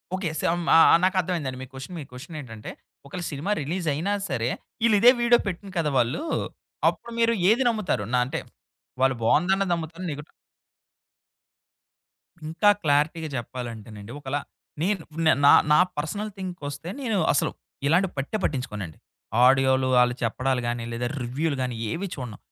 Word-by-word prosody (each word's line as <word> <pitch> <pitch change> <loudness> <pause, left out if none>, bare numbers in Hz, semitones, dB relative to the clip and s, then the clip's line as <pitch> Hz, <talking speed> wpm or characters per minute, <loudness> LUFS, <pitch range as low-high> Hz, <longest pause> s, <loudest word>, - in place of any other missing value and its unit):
Okay. 185 -3 -2
Some 175 +1 +1
ఆహ్, 165 - +8
ఆహ్, - - +6
నాకర్థమైందండి, 180 -8 0
మీ - - -5
question 135 +7 -8
మీ - - -5
question 150 +7 -10
ఏంటంటే 115 -6 -8 0.3
ఒకవేళ 175 +6 -6
సినిమా 150 +8 -3
రిలీజ్ 170 +4 -3
అయినా 170 +8 -1 0.2
సరే 120 -3 -1 0.4
ఈళ్ళు 225 -2 +5
ఇదే 240 +4 +8
వీడియో 240 0 +5
పెట్టిన్రు 195 +1 -5
కదా 155 -2 +1
వాళ్ళు, 120 - +1 0.7
అప్పుడు 235 - -8
మీరు 230 0 +4 0.2
ఏది 235 +5 +4
నమ్ముతారు? 215 - -1
నా 125 - +4
అంటే, 130 - -3 0.6
వాళ్ళు 130 0 +3
బాగుందన్నది 185 +9 +2
నమ్ముతార? 165 +1 -5
నెగటివ్ 145 +1 -8 2.2
ఇంకా 175 +6 +3
క్లారిటీగా 155 +2 +1
జెప్పాలంటేనండి, 115 -4 -7
ఒకలా 140 0 -2 0.4
నేను 190 +1 0 0.2
న - - +5 0.2
నా - - +9 0.2
నా - - +6 0.2
పర్సనల్ 200 +8 -3
థింక్‌‌కొస్తే 170 -5 -6
నేను 225 -6 0 0.2
అసలు - - +1 0.4
ఇలాంటివి 180 +4 +2
పట్టే 140 +10 -2
పట్టించుకోనండి. 105 - -3 0.5
ఆడియోలు 130 0 +4
వాళ్ళు 125 0 +4
చెప్పడాలు 130 +2 0
గాని, 120 0 -2
లేదా 120 +1 -2
రివ్యూలు 140 +6 -1
గాని 125 -2 -2 0.2
ఏవి 195 - -3
చూడను? 125 -7 -7
150 Hz, 145 wpm, -25 LUFS, 130-185 Hz, 2.2 s, నా